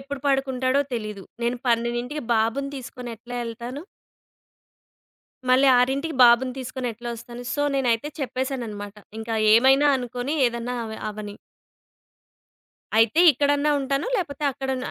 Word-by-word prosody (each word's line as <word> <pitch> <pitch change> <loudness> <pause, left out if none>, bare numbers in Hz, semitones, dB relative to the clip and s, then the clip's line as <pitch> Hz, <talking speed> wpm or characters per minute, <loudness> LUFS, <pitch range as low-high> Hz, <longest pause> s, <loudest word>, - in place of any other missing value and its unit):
ఎప్పుడు 275 0 -7
పడుకుంటాడో 270 -1 +1
తెలీదు. 215 -4 -5 0.2
నేను 240 +1 0
పన్నెండింటికి 240 +4 0
బాబుని 230 +5 0
తీసుకొని 250 -1 -8
ఎట్లా 245 +3 -10
యెళ్తాను? 235 +3 -6 1.7
మళ్ళీ 260 +2 +5
6కి 275 +5 0
బాబుని 240 +2 +5
తీసుకొనెట్లా 245 -2 -5
ఒస్తాను? 235 +1 -9
సో, 290 - 0
నేనైతే 250 0 +1
చెప్పేసానన్నమాట. 240 -6 -4 0.2
ఇంకా 225 0 -3 0.2
ఏమైనా 270 +5 +5
అనుకోని 245 +4 -3
ఏదన్నా 235 +1 -3
అవ 220 0 -7
అవ్వని. 210 -1 -7 1.6
అయితే, 225 +9 +4
ఇక్కడన్నా 285 +2 +2
ఉంటాను 275 - -1
లేపోతే, 300 -6 -5
అక్కడన్నా 265 -1 -3
250 Hz, 115 wpm, -24 LUFS, 235-270 Hz, 1.7 s, మళ్ళీ